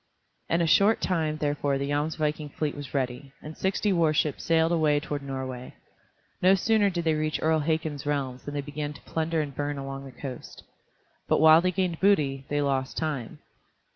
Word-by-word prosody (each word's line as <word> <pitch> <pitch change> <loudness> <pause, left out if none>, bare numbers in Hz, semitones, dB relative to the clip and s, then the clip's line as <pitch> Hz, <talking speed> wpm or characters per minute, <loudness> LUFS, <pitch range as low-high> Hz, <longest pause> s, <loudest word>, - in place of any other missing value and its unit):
In 170 - +2
a - - +3
short 200 +7 +4
time 160 -4 0
therefore 145 -2 0
the 140 +1 -3
Jomsviking 150 0 -1
fleet 150 -2 -1
was 145 -2 -8
ready, 135 +1 -3
and 155 +1 -9
sixty 195 +1 0
warships 155 -4 +1
sailed 165 0 +3
away 155 -3 +3
toward 145 -1 -4
Norway. 130 -2 -6 0.7
No 185 +2 +6
sooner 210 +1 +3
did 175 -2 -3
they 160 -1 +2
reach 155 0 -1
Earl 160 0 +2
Hakon's 155 -2 -2
realms 135 -3 -2
than 145 - -5
they 145 - -1
began 145 0 -4
to - - -14
plunder 160 0 -1
and 145 -2 -5
burn 145 +1 -3
along 135 0 -6
the 135 - -9
coast. 130 -3 -8 0.6
But - - +3
while 160 +1 +8
they 185 +1 +1
gained 180 -3 -1
booty, 140 -9 +2
they 145 0 0
lost 135 -2 -1
time. 150 -7 -3
150 Hz, 185 wpm, -27 LUFS, 140-160 Hz, 0.7 s, while